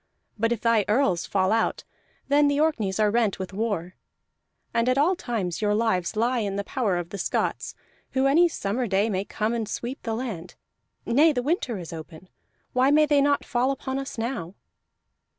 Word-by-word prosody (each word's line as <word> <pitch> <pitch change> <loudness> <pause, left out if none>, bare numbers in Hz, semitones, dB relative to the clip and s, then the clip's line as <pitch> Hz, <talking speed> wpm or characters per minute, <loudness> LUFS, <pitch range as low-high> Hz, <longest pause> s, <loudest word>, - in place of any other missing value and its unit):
But 230 +2 0
if 235 - -1
thy 230 -2 +3
earls 205 -6 +1
fall 190 0 +1
out, 225 0 0 0.4
then 290 +1 +4
the 285 0 +1
Orkneys 220 -12 0
are 210 -1 +3
rent 225 -3 +1
with 190 0 -6
war. 195 -4 -2 0.8
And 235 +2 +2
at 255 - +2
all 325 +7 +3
times 215 - -3
your 210 -1 +2
lives 210 -6 0
lie 240 +3 +1
in 200 -3 -2
the 200 - -2
power 205 -6 -1
of 175 -1 -4
the 200 - -6
Scots, - - -2 0.4
who 265 0 +2
any 330 +6 +5
summer 235 -2 -2
day 200 +3 +1
may 190 0 -1
come 215 +2 -2
and 225 -3 -2
sweep 245 +5 -5
the 225 -1 -3
land. 205 -8 -5 0.5
Nay, 295 +7 +4
the 250 -4 -2
winter 270 - -1
is 170 -2 -8
open: 160 +2 -10 0.4
why 255 +2 +3
may 305 +1 +5
they 290 -2 +3
not 285 0 +2
fall 245 +2 +1
upon 270 0 -3
us 275 -2 -6
now?" 225 -7 -4
230 Hz, 190 wpm, -25 LUFS, 195-265 Hz, 0.8 s, any